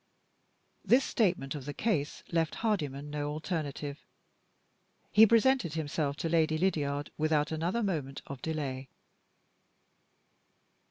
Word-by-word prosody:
This 255 +3 +5
statement 180 - +1
of 145 -4 -6
the 145 0 -5
case 155 -11 -1
left 165 -2 +1
Hardyman 150 -9 -1
no 145 0 -2
alternative. 150 -2 -4 1.1
He 220 +1 +8
presented 230 - +3
himself 145 -2 -1
to 165 - -3
Lady 160 -1 +2
Lydiard 145 -5 0
without 155 0 +2
another 170 +9 -1
moment 150 -9 -3
of 140 -2 -8
delay. 135 -5 -3
155 Hz, 110 wpm, -31 LUFS, 145-175 Hz, 1.1 s, He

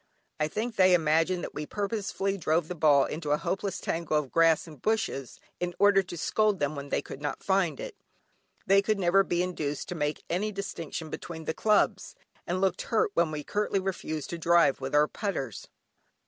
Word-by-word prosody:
I 150 - +2
think 220 +8 -4
they 185 -1 +6
imagined 165 +2 +2
that - - -6
we 150 0 -5
purposely 200 -1 -2
drove 160 -2 0
the 180 - -4
ball 150 -4 +4
into 155 -1 -5
a 150 - +3
hopeless 195 +4 -2
tangle 165 -2 -1
of 145 -4 -2
grass 165 -1 +4
and 155 -4 -13
bushes 210 - -1 0.2
in 175 -1 -3
order 200 -1 +5
to 180 -2 -8
scold 210 +4 +1
them 145 +1 -1
when 140 0 -7
they - - 0
could 135 - -9
not 145 - -4
find 190 -3 +1
it. - - -6 0.7
They 195 +1 +5
could 215 +1 0
never 195 +1 +4
be 175 -1 0
induced 155 -5 -3
to - - -2
make 150 -3 -2
any 200 +5 -1
distinction 165 -5 -5
between 160 -2 -7
the 160 - -1
clubs, 215 - +1 0.3
and 180 +2 -1
looked 190 0 +1
hurt 220 -3 +2
when 170 -3 +2
we 150 -1 -4
curtly 205 +1 0
refused 165 -6 -4
to 170 - -4
drive 170 -4 +4
with 135 +2 -2
our 150 +1 +5
putters. 150 - -4
175 Hz, 195 wpm, -28 LUFS, 155-195 Hz, 0.7 s, they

